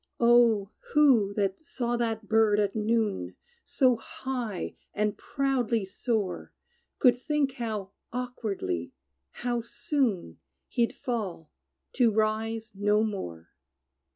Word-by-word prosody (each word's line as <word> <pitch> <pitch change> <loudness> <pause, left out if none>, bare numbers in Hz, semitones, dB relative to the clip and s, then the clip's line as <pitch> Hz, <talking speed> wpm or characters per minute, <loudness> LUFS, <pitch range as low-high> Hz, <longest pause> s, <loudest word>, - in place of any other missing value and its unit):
O! 235 -4 +5 0.2
who 260 -9 +5
that 200 +7 -1
saw 240 -7 -2
that 225 -2 -2
bird 220 -1 +4
at 205 0 +1
noon 220 -2 0 0.3
So 255 -4 +3
high 235 -4 -4 0.2
and 210 -1 +1
proudly 250 -6 0
soar, 205 0 -2 0.5
Could 250 -4 +5
think 285 +1 0
how 215 -6 -4 0.2
awkwardly 205 - -3 0.5
how 240 -1 +1
soon, 235 - -1 0.3
He'd 235 -1 +1
fall 195 - -4 0.4
to 245 -3 +4
rise 220 +1 0
no 205 +2 +2
more? 85 - -4
225 Hz, 105 wpm, -28 LUFS, 205-245 Hz, 0.5 s, O